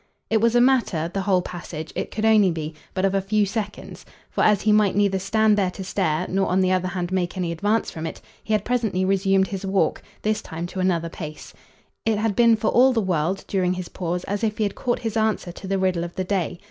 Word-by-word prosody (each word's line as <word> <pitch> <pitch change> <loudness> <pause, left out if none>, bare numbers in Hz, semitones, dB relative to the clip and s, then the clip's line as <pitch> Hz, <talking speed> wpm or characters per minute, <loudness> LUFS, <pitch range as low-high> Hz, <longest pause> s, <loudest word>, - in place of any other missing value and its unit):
It 220 -1 +3
was 230 +1 +3
a 240 - +6
matter, 230 -11 +2
the 195 - -1
whole 190 -2 +2
passage 165 -3 -7
it - - -3
could 215 +1 -2
only 215 -3 +5
be 160 -2 -4 0.2
but 190 0 +1
of 195 - +1
a 195 - +2
few 205 +2 +1
seconds; 205 0 -5 0.3
for - - 0
as 210 -2 +3
he 215 - +3
might 210 -2 +3
neither 200 -2 +2
stand 215 +2 +2
there 190 -2 +2
to 190 +1 -7
stare 180 -3 0
nor 195 +1 0
on 185 - +2
the 185 0 +2
other 185 0 +1
hand 180 -1 -3
make 185 -1 -1
any 175 -2 -1
advance 205 +7 0
from 160 0 -5
it, - - -7 0.2
he - - -6
had 210 -1 +1
presently 220 -7 0
resumed 195 0 +2
his 195 -1 -5
walk, 195 0 +1 0.2
this 215 0 0
time 165 +1 -6
to 180 +2 -6
another 170 -3 +1
pace. 155 -2 -8 0.5
It 220 -1 +1
had 215 -1 0
been 235 -1 +5
for 215 0 0
all 260 +2 +5
the 230 - +1
world, 185 -1 -1
during 185 -2 +1
his 180 -1 -6
pause, 180 0 -3
as 205 +2 -3
if 215 -1 0
he 220 - +1
had 200 - -1
caught 245 -2 -1
his 225 -2 -4
answer 220 -5 0
to 190 +2 -10
the 195 0 0
riddle 185 -2 0
of 170 0 -7
the 185 - -1
day. 180 -2 -2
195 Hz, 250 wpm, -23 LUFS, 180-215 Hz, 0.5 s, a